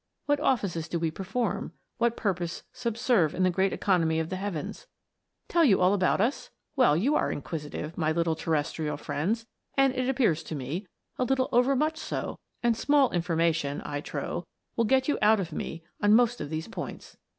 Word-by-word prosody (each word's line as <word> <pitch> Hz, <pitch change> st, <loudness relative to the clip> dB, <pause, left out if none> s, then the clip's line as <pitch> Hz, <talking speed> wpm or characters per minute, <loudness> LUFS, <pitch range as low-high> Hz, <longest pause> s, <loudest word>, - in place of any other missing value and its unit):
What 290 Hz, -1 st, +2 dB
offices 195 Hz, -, 0 dB
do 170 Hz, -, -1 dB
we 165 Hz, -1 st, 0 dB
perform 195 Hz, 0 st, -2 dB, 0.3 s
what 235 Hz, 0 st, +2 dB
purpose 175 Hz, -4 st, -2 dB
subserve 235 Hz, -, +1 dB
in 185 Hz, -, +1 dB
the 185 Hz, -, +4 dB
great 190 Hz, +2 st, +1 dB
economy 165 Hz, -5 st, +2 dB
of 160 Hz, 0 st, -2 dB
the 185 Hz, -, -2 dB
heavens? 195 Hz, -, -5 dB, 0.6 s
Tell 340 Hz, -, +3 dB
you 225 Hz, -11 st, +5 dB
all 185 Hz, +2 st, +4 dB
about 185 Hz, -2 st, +2 dB
us 235 Hz, +8 st, 0 dB, 0.2 s
1 265 Hz, -, +3 dB
Well, 150 Hz, -, +4 dB
you 255 Hz, -, +2 dB
are -, -, +1 dB
inquisitive, 150 Hz, +1 st, -5 dB
my 155 Hz, -1 st, +2 dB
little 165 Hz, 0 st, +1 dB
terrestrial 155 Hz, -1 st, -1 dB
friends, 205 Hz, +11 st, -2 dB, 0.3 s
and 270 Hz, -1 st, +4 dB
it 255 Hz, 0 st, -1 dB
ap 265 Hz, -, +1 dB
pears 175 Hz, -, +2 dB
to 160 Hz, -, -5 dB
me, 150 Hz, +9 st, -4 dB, 0.3 s
a -, -, +3 dB
little 260 Hz, 0 st, +1 dB
overmuch 275 Hz, +6 st, +3 dB
so; -, -, -4 dB, 0.2 s
and 235 Hz, -1 st, +3 dB
small 280 Hz, +2 st, +3 dB
infor 175 Hz, -1 st, -1 dB
mation, 160 Hz, -4 st, +1 dB
I 145 Hz, -1 st, -3 dB
trow, 175 Hz, +3 st, -4 dB, 0.3 s
will 230 Hz, -, +2 dB
you -, -, -2 dB
get 260 Hz, -, -10 dB
out 215 Hz, 0 st, +5 dB
of 175 Hz, -3 st, -3 dB
me 165 Hz, +1 st, -5 dB, 0.2 s
on 205 Hz, +1 st, +6 dB
most 240 Hz, 0 st, +3 dB
of -, -, -4 dB
these 160 Hz, +1 st, -3 dB
points. 230 Hz, -, -7 dB
190 Hz, 195 wpm, -28 LUFS, 160-240 Hz, 0.6 s, on